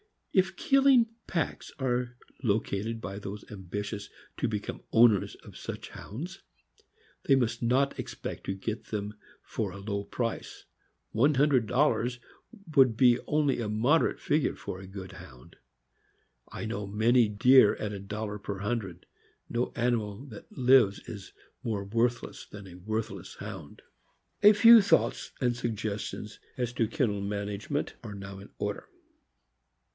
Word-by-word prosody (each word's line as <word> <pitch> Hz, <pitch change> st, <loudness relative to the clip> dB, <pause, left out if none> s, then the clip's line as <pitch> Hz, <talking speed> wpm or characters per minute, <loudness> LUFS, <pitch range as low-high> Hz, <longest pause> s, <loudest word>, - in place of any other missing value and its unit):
If 190 Hz, -1 st, +3 dB
killing 270 Hz, -3 st, +5 dB, 0.2 s
packs 165 Hz, -4 st, -2 dB
are 125 Hz, -2 st, -1 dB, 0.2 s
located 110 Hz, -1 st, -1 dB
by 100 Hz, -2 st, -5 dB
those 100 Hz, 0 st, -7 dB
ambitious 105 Hz, +1 st, -5 dB, 0.3 s
to -, -, 0 dB
become 105 Hz, -2 st, -4 dB
owners 115 Hz, -4 st, +5 dB
of -, -, -12 dB
such -, -, -7 dB
Hounds, 170 Hz, -, -8 dB, 0.8 s
they 135 Hz, -, +5 dB
must 115 Hz, -3 st, 0 dB
not 130 Hz, +4 st, +1 dB
expect -, -, -6 dB
to 95 Hz, -, -2 dB
get 110 Hz, +4 st, -4 dB
them 105 Hz, -1 st, -4 dB, 0.3 s
fora 100 Hz, -3 st, -4 dB
low 100 Hz, 0 st, -3 dB
price; 115 Hz, +2 st, -4 dB, 0.5 s
one 140 Hz, +6 st, +3 dB
hundred 135 Hz, -4 st, +3 dB
dollars 125 Hz, -1 st, +1 dB, 0.6 s
would 130 Hz, -5 st, +6 dB
be 125 Hz, -1 st, +5 dB
only 150 Hz, -3 st, +2 dB
a 110 Hz, -3 st, -2 dB
moderate 120 Hz, +10 st, +2 dB
figure 150 Hz, 0 st, +1 dB
for 95 Hz, -, -6 dB
a 95 Hz, -, -10 dB
good 95 Hz, -1 st, -8 dB
Hound. 85 Hz, -10 st, -14 dB, 0.9 s
I -, -, -6 dB
know 105 Hz, -2 st, -4 dB
many 115 Hz, +4 st, +4 dB
dear 105 Hz, +3 st, +6 dB
at 105 Hz, -, -4 dB
a 100 Hz, -, -5 dB
dollar 105 Hz, +1 st, -5 dB
per 100 Hz, -1 st, -5 dB
hundred. 100 Hz, -5 st, -3 dB, 0.4 s
No 120 Hz, +1 st, -1 dB
animal 120 Hz, -1 st, -1 dB
that 110 Hz, -5 st, -11 dB
lives 125 Hz, -6 st, +4 dB
is 100 Hz, -3 st, -9 dB, 0.3 s
more 105 Hz, -4 st, -2 dB
worthless 115 Hz, +4 st, -1 dB
than 100 Hz, -1 st, -10 dB
a 90 Hz, -, -11 dB
worthless 110 Hz, +4 st, -4 dB
Hound. 95 Hz, -8 st, -9 dB, 0.6 s
A 210 Hz, +1 st, +9 dB
few 230 Hz, +2 st, +9 dB
thoughts 200 Hz, -, +1 dB
and 120 Hz, -2 st, +2 dB
suggestions 105 Hz, -2 st, -4 dB, 0.2 s
as 125 Hz, -2 st, -1 dB
to 115 Hz, -2 st, +1 dB
kennel 115 Hz, -6 st, 0 dB
manage 100 Hz, +1 st, -4 dB
ment 145 Hz, 0 st, -2 dB
are 105 Hz, -4 st, -7 dB
now 100 Hz, 0 st, -8 dB
in 100 Hz, -, -12 dB
order. -, -, -4 dB
110 Hz, 140 wpm, -29 LUFS, 100-125 Hz, 0.9 s, A